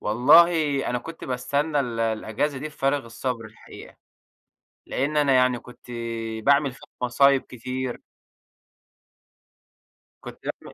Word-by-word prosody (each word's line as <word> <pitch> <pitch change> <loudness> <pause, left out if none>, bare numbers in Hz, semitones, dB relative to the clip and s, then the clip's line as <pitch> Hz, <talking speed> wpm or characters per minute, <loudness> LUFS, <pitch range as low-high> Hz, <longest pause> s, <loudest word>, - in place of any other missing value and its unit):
والله 130 +11 +6 0.4
أنا 125 - 0
كنت 165 +5 -9
باستنى 140 +4 -1
ال 120 -3 -3
الإجازة 115 +5 -1
دي 150 - -5
بفارغ 140 -2 -1
الصبر 115 0 -4
الحقيقة، 110 - -13 0.9
لأن 145 +4 -2
أنا 145 -2 +3
يعني 125 -1 +3
كنت 125 0 -15 0.5
باعمل 140 -1 +4
فيها - - -16
مصايب 135 +2 +4
كتير. 125 +1 -5 2.2
كنت - - -10
باعمل - - -6
130 Hz, 110 wpm, -24 LUFS, 120-140 Hz, 2.2 s, والله